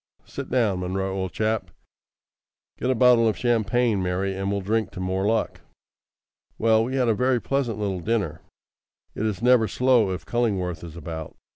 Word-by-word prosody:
"Sit - - -7
down, 110 -7 +1
Munro, 95 +1 -2
old 95 -2 -3
chap. 110 +4 -1 1.1
Get 125 - -1
a 130 - +2
bottle 125 -2 +5
of 110 - 0
champagne, 120 -2 +1
Mary, 95 +2 -1
and 95 +1 -2
we'll 100 -1 -1
drink 110 +2 0
to - - -7
more 95 +2 -1
luck." 110 0 -1 1.0
Well, 110 0 +3
we 130 +2 -3
had 130 -2 +2
a 115 - +4
very 125 +2 +1
pleasant 130 -4 -1
little 100 -3 -2
dinner. 110 +3 -2 0.7
It 110 - -2
is 105 +1 -4
never 125 -3 +5
slow 125 -1 +3
if 90 0 -4
Cullingworth 95 -9 -1
is 85 -2 -9
about. 80 -1 -7
110 Hz, 170 wpm, -24 LUFS, 95-120 Hz, 1.1 s, bottle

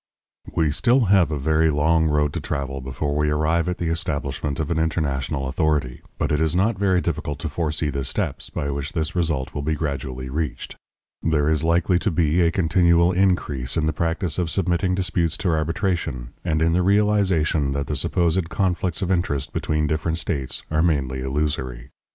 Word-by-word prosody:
We 80 - +3
have 75 -1 0
still 120 -1 +3
a 95 -3 +6
very 80 +3 +2
long 80 +2 +2
road 75 -1 +1
to - - -2
travel 70 -2 -3
before 65 +3 -3
we 75 0 +1
arrive 80 +3 +1
at 90 - -2
the 85 - -2
establishment 70 -3 -3
of 80 -1 -2
an 80 - +1
international 70 -4 -1
authority, 75 -3 0 0.2
but - - -1
it 75 +1 +1
is 80 +1 +1
not 105 +5 +2
very 95 -3 +2
difficult 75 -2 -3
to 75 +2 -4
foresee 75 -1 -1
the 70 0 -2
steps 65 - -3
by 70 - -3
which 70 +1 -4
this 80 0 -2
result 80 -7 -1
will 75 - -3
be 80 +2 -1
gradually 65 -4 -4
reached. 65 -2 -4 0.5
There 75 -2 +1
is 80 -1 +2
likely 85 +2 +2
to - - 0
be 80 0 +2
a 85 - +4
continual 85 0 +3
increase 85 -9 0
in 80 - +1
the 80 - 0
practice 85 +1 -1
of 85 -2 0
submitting 90 +1 0
disputes 85 -3 0
to 100 -4 -1
arbitration, 80 - -1
and 80 0 +1
in 80 0 +2
the 90 - +3
realization 95 -7 +2
that 70 0 -2
the - - -3
supposed 85 0 0
conflicts 90 -2 -1
of 95 - -1
interest 75 -6 -1
between 75 0 0
different 80 +2 -1
states 70 -5 -2
are 80 0 +2
mainly 70 -6 0
illusory. 65 -3 -2
80 Hz, 185 wpm, -23 LUFS, 70-85 Hz, 0.5 s, a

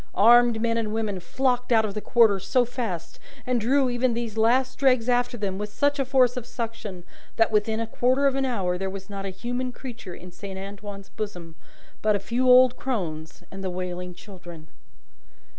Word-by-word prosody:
Armed 235 +1 +6
men 230 0 0
and 215 -1 -3
women 210 -4 -2
flocked 250 +7 -1
out 220 -2 +4
of 205 - -4
the 210 - -4
Quarter 220 -4 +4
so 245 +6 +2
fast, 225 -9 -5 0.3
and 250 -2 0
drew 265 +4 +3
even 245 -1 0
these 230 -2 -4
last 250 +4 +2
dregs 255 -4 +3
after 245 0 +1
them 195 -3 -3
with 210 0 -4
such 285 +5 +1
a 275 - +1
force 255 -1 +3
of 245 -2 -5
suction, 225 -7 -6 0.3
that 225 -1 +3
within 220 +1 +1
a 230 - -1
quarter 255 +4 +1
of 275 - +4
an 270 0 0
hour 190 -9 -1
there 190 0 -2
was 195 +1 -8
not 195 0 -5
a - - -3
human 245 +6 -4
creature 235 -8 -9
in 180 0 -11
Saint 190 +2 -8
Antoine's 200 0 -8
bosom 175 -6 -6 0.5
but 215 -1 +3
a - - 0
few 240 +6 0
old 255 0 +7
crones 165 -11 -4
and 195 0 -7
the 190 - -2
wailing 180 0 -5
children. 175 -5 -12
225 Hz, 195 wpm, -25 LUFS, 195-245 Hz, 0.5 s, old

